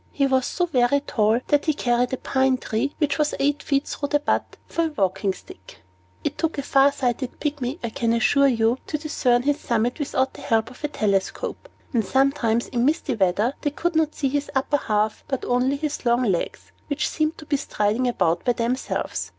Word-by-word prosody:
He 280 Hz, -, +1 dB
was 260 Hz, -2 st, +2 dB
so 355 Hz, -, 0 dB
very 275 Hz, -3 st, +2 dB
tall 220 Hz, -2 st, +1 dB
that 290 Hz, 0 st, +3 dB
he 310 Hz, -, +2 dB
carried 245 Hz, -2 st, +1 dB
a 260 Hz, -, -1 dB
pine 265 Hz, 0 st, +1 dB
tree, 250 Hz, +4 st, -2 dB
which 290 Hz, -2 st, 0 dB
was 300 Hz, 0 st, +1 dB
eight 290 Hz, +1 st, +1 dB
feet 275 Hz, 0 st, 0 dB
through 285 Hz, -, -3 dB
the 290 Hz, -, +3 dB
butt, 295 Hz, -, -1 dB
for 335 Hz, -, 0 dB
a 315 Hz, -, -4 dB
walking 190 Hz, 0 st, +1 dB
stick. 95 Hz, -, -13 dB, 0.4 s
It -, -, -3 dB
took 325 Hz, -2 st, -1 dB
a 280 Hz, -, -2 dB
far 275 Hz, 0 st, +4 dB
sighted 255 Hz, -2 st, -2 dB
Pygmy, 285 Hz, -2 st, -2 dB
I 235 Hz, -, -2 dB
can 230 Hz, +1 st, 0 dB
assure 280 Hz, +4 st, +4 dB
you, 235 Hz, 0 st, +2 dB
to 305 Hz, -, -1 dB
discern 255 Hz, -5 st, +1 dB
his 290 Hz, +1 st, +1 dB
summit 235 Hz, +4 st, 0 dB
without 265 Hz, -2 st, 0 dB
the -, -, -11 dB
help 225 Hz, +1 st, +1 dB
of 255 Hz, -, -16 dB
a -, -, +1 dB
telescope; 205 Hz, -, -2 dB, 0.2 s
and 230 Hz, -3 st, +2 dB
sometimes, 250 Hz, -3 st, +1 dB
in 240 Hz, -1 st, 0 dB
misty 290 Hz, 0 st, +1 dB
weather, 210 Hz, +4 st, +1 dB
they 290 Hz, -, +1 dB
could 335 Hz, +4 st, -2 dB
not 315 Hz, -1 st, +1 dB
see 275 Hz, -, 0 dB
his 285 Hz, +1 st, -2 dB
upper 270 Hz, +2 st, +2 dB
half, 215 Hz, -4 st, -1 dB
but 270 Hz, -2 st, -3 dB
only 250 Hz, +3 st, +2 dB
his 295 Hz, +1 st, -3 dB
long 240 Hz, 0 st, +2 dB
legs, 190 Hz, -7 st, -2 dB, 0.2 s
which 290 Hz, 0 st, -1 dB
seemed 310 Hz, 0 st, -1 dB
to 310 Hz, -, -11 dB
be 285 Hz, -1 st, +1 dB
striding 225 Hz, -2 st, 0 dB
about 170 Hz, -8 st, +1 dB
by 245 Hz, -, +2 dB
themselves. 240 Hz, +3 st, -2 dB
260 Hz, 205 wpm, -23 LUFS, 235-290 Hz, 0.4 s, far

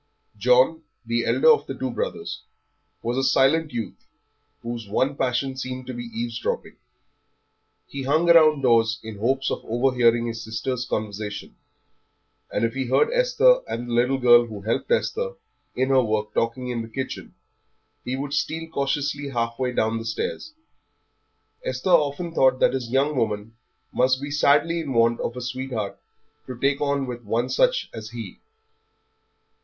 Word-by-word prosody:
John, 125 Hz, +8 st, +3 dB, 0.2 s
the 115 Hz, 0 st, -1 dB
elder 475 Hz, -, +5 dB
of 455 Hz, -, +2 dB
the -, -, -5 dB
two -, -, -3 dB
brothers, 485 Hz, -4 st, -4 dB, 0.6 s
was 120 Hz, +2 st, -1 dB
a 135 Hz, -, +1 dB
silent 135 Hz, +4 st, +3 dB
youth 120 Hz, -2 st, -6 dB, 0.6 s
whose 115 Hz, -3 st, -6 dB
one 130 Hz, +7 st, +1 dB
passion 130 Hz, 0 st, -1 dB
seemed 130 Hz, -1 st, -5 dB
to 130 Hz, -, -6 dB
be 120 Hz, -, -5 dB
eavesdropping. 115 Hz, 0 st, -4 dB, 1.1 s
He 140 Hz, -, -7 dB
hung 150 Hz, +5 st, +2 dB
round 155 Hz, -4 st, +6 dB
doors 115 Hz, -2 st, +3 dB
in 110 Hz, -2 st, -8 dB
the -, -, -13 dB
hopes 135 Hz, +3 st, +1 dB
of -, -, -3 dB
overhearing 120 Hz, -1 st, +2 dB
his 115 Hz, -1 st, -4 dB
sisters' 125 Hz, +3 st, -3 dB
conversation 105 Hz, -2 st, -4 dB, 1.0 s
and -, -, +1 dB
if 115 Hz, -, -2 dB
he 135 Hz, -1 st, -3 dB
heard 130 Hz, -, +3 dB
Esther -, -, +4 dB
and 120 Hz, +1 st, -4 dB
the 120 Hz, -, -4 dB
little 125 Hz, +3 st, +2 dB
girl 120 Hz, -2 st, +6 dB
who 105 Hz, -3 st, -8 dB
helped 110 Hz, -, -2 dB
Esther 480 Hz, 0 st, 0 dB, 0.4 s
in 130 Hz, +1 st, 0 dB
her 135 Hz, -1 st, +5 dB
work 105 Hz, -1 st, -2 dB
talking 115 Hz, +2 st, -1 dB
in 120 Hz, -2 st, -2 dB
the 115 Hz, -, -7 dB
kitchen, 130 Hz, +4 st, -6 dB, 0.7 s
he 125 Hz, -, -3 dB
would 140 Hz, +1 st, -4 dB
steal 160 Hz, +2 st, -2 dB
cautiously 140 Hz, 0 st, -1 dB
halfway 120 Hz, 0 st, -2 dB
down 115 Hz, -1 st, 0 dB
the 115 Hz, -, -7 dB
stairs. 215 Hz, -, -4 dB, 1.1 s
Esther -, -, -2 dB
often 165 Hz, +1 st, +2 dB
thought 130 Hz, -4 st, +3 dB
that -, -, +3 dB
his 125 Hz, -3 st, -3 dB
young 140 Hz, +4 st, +1 dB
woman 110 Hz, -2 st, -2 dB, 0.4 s
must 130 Hz, +1 st, +2 dB
be 145 Hz, +1 st, -6 dB
sadly 150 Hz, +3 st, +3 dB
in 145 Hz, -5 st, -4 dB
want 115 Hz, 0 st, +3 dB
of 120 Hz, -, -3 dB
a -, -, -4 dB
sweetheart 125 Hz, -4 st, -4 dB, 0.5 s
to 130 Hz, -2 st, -6 dB
take 140 Hz, +1 st, +1 dB
on 140 Hz, -1 st, 0 dB
with 120 Hz, -1 st, -6 dB
one 115 Hz, +4 st, -1 dB
such -, -, +2 dB
as 110 Hz, -1 st, -7 dB
he. 115 Hz, -5 st, -8 dB
130 Hz, 160 wpm, -24 LUFS, 115-140 Hz, 1.1 s, round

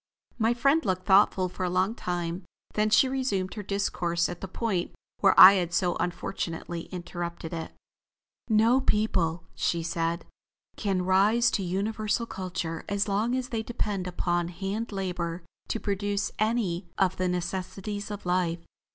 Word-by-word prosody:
My 230 Hz, +2 st, +2 dB
friend 275 Hz, +6 st, +3 dB
looked 185 Hz, -2 st, -1 dB
thoughtful 190 Hz, -1 st, +4 dB
for 180 Hz, -, -6 dB
a 180 Hz, -, 0 dB
long 185 Hz, +4 st, +1 dB
time, 175 Hz, -3 st, -3 dB, 0.3 s
then 215 Hz, 0 st, +2 dB
she 220 Hz, +5 st, +5 dB
resumed 255 Hz, -8 st, -1 dB
her 210 Hz, -, -5 dB
discourse 175 Hz, -4 st, -1 dB
at 175 Hz, -, -7 dB
the 195 Hz, -, -4 dB
point 190 Hz, -2 st, -2 dB, 0.2 s
where 195 Hz, -2 st, +5 dB
I 185 Hz, +1 st, +12 dB
had 175 Hz, -3 st, 0 dB
so 180 Hz, -2 st, +1 dB
unfortunately 170 Hz, -1 st, -3 dB
interrupted 170 Hz, -2 st, -5 dB
it. 165 Hz, -1 st, -5 dB, 0.8 s
"No 225 Hz, +4 st, +4 dB
people," 180 Hz, -8 st, +1 dB
she 170 Hz, -1 st, -1 dB
said, 165 Hz, +1 st, -2 dB, 0.5 s
"can 190 Hz, -4 st, -1 dB
rise 205 Hz, +6 st, +4 dB
to -, -, 0 dB
universal 210 Hz, +5 st, -1 dB
culture 180 Hz, -5 st, -4 dB
as 200 Hz, +1 st, 0 dB
long 215 Hz, +5 st, +1 dB
as 255 Hz, -1 st, -2 dB
they 225 Hz, -2 st, -2 dB
depend 210 Hz, -5 st, -3 dB
upon 175 Hz, -1 st, 0 dB
hand 195 Hz, +6 st, -4 dB
labor 180 Hz, -3 st, -3 dB, 0.2 s
to 225 Hz, -, -2 dB
produce 205 Hz, 0 st, -1 dB
any 210 Hz, -5 st, 0 dB
of 185 Hz, -1 st, +2 dB
the 185 Hz, -, 0 dB
necessities 190 Hz, +3 st, -3 dB
of 205 Hz, -2 st, -7 dB
life. 180 Hz, -2 st, 0 dB
190 Hz, 150 wpm, -27 LUFS, 175-210 Hz, 0.8 s, I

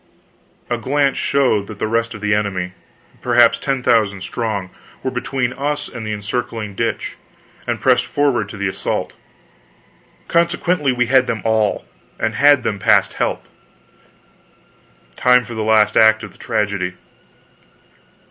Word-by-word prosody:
A 120 Hz, -1 st, -2 dB
glance 140 Hz, +3 st, +1 dB
showed 130 Hz, -8 st, +1 dB
that 110 Hz, -, -9 dB
the -, -, -2 dB
rest 115 Hz, +1 st, -1 dB
of 105 Hz, -, -10 dB
the 105 Hz, 0 st, +1 dB
enemy 95 Hz, -3 st, -1 dB, 0.5 s
perhaps -, -, +4 dB
ten 135 Hz, -2 st, -2 dB
thousand 105 Hz, -5 st, +2 dB
strong 100 Hz, -2 st, -3 dB, 0.3 s
were 130 Hz, -, -1 dB
between 125 Hz, 0 st, -2 dB
us 145 Hz, +2 st, -2 dB
and 115 Hz, -2 st, -7 dB
the -, -, -3 dB
encircling 105 Hz, 0 st, -4 dB
ditch, 115 Hz, +2 st, -3 dB, 0.5 s
and -, -, -1 dB
pressing -, -, +3 dB
forward 130 Hz, -8 st, +1 dB
to 105 Hz, -, -9 dB
the 100 Hz, 0 st, -1 dB
assault. 95 Hz, -, -3 dB, 1.1 s
Consequently 170 Hz, -3 st, +1 dB
we 125 Hz, -1 st, +1 dB
had 130 Hz, +1 st, +3 dB
them 110 Hz, -4 st, -3 dB
all! 110 Hz, -2 st, +1 dB, 0.3 s
and 110 Hz, -, -1 dB
had 140 Hz, +2 st, +5 dB
them 100 Hz, -2 st, -2 dB
past -, -, +3 dB
help. -, -, -2 dB, 1.7 s
Time 125 Hz, -1 st, +4 dB
for 120 Hz, -, -8 dB
the 110 Hz, -, -3 dB
last 105 Hz, -1 st, +3 dB
act 110 Hz, 0 st, +5 dB
of -, -, -8 dB
the -, -, -22 dB
tragedy. 100 Hz, -4 st, -2 dB
115 Hz, 145 wpm, -19 LUFS, 105-130 Hz, 1.7 s, had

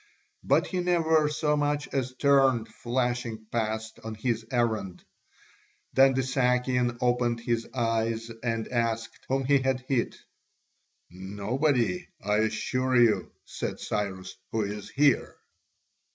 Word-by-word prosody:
But -, -, +3 dB
he 185 Hz, -, -3 dB
never 160 Hz, -4 st, +3 dB
so 150 Hz, 0 st, +1 dB
much 145 Hz, 0 st, 0 dB
as 130 Hz, -2 st, -2 dB
turned, 135 Hz, -4 st, +3 dB
flashing 120 Hz, -1 st, -2 dB
past 110 Hz, -1 st, -2 dB
on 110 Hz, 0 st, -5 dB
his 115 Hz, 0 st, -1 dB
errand. 110 Hz, -7 st, -1 dB, 0.9 s
Then 135 Hz, 0 st, +5 dB
the 130 Hz, -, +1 dB
Sakian 125 Hz, -1 st, +1 dB
opened 120 Hz, -1 st, +1 dB
his 115 Hz, -1 st, -1 dB
eyes 115 Hz, -1 st, -1 dB
and 115 Hz, -2 st, -2 dB
asked 115 Hz, -2 st, -1 dB
whom 135 Hz, 0 st, +1 dB
he 140 Hz, +1 st, +4 dB
had 130 Hz, -1 st, 0 dB
hit? 130 Hz, -2 st, -1 dB, 0.9 s
"Nobody, 100 Hz, -, -1 dB
I 105 Hz, +1 st, 0 dB
assure 125 Hz, +4 st, 0 dB
you," 120 Hz, -3 st, +4 dB
said -, -, -5 dB
Cyrus, 95 Hz, -3 st, -3 dB, 0.2 s
"who 110 Hz, -1 st, 0 dB
is 105 Hz, 0 st, -5 dB
here." 140 Hz, -2 st, +2 dB
120 Hz, 125 wpm, -27 LUFS, 110-130 Hz, 0.9 s, Then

